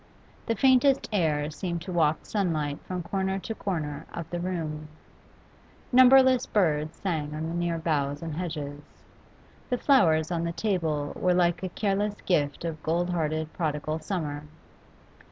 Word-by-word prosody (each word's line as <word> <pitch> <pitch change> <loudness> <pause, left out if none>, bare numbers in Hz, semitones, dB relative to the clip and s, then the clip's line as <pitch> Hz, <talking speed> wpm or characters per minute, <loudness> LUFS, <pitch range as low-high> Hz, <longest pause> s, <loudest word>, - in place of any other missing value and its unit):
The 230 - +1
faintest 265 +1 +4
air 155 -5 +1
seemed 170 +1 -4
to 185 - -6
waft 160 -3 +1
sunlight 155 -8 -1
from 180 -1 -3
corner 190 +2 -1
to 225 +4 -5
corner 155 -9 -4
of 170 -2 -6
the 175 - -2
room; 160 -4 -3 1.0
numberless 260 0 +6
birds 155 -5 +1
sang 155 -6 -2
on 155 +1 -3
the - - -4
near 170 -1 -1
boughs 145 -2 -1
and 165 -2 -4
hedges; 150 -4 -4 0.9
the 250 - +1
flowers 165 - +3
on 170 -1 -1
the 170 0 -2
table 160 -8 -1
were 180 -1 +2
like 175 -1 +2
a 185 - -3
careless 205 +2 -1
gift 145 -3 0
of 160 -2 -4
gold 175 +3 0
hearted 155 -2 -1
prodigal 155 -1 -2
summer. 155 -4 -4
170 Hz, 150 wpm, -27 LUFS, 155-190 Hz, 1.0 s, numberless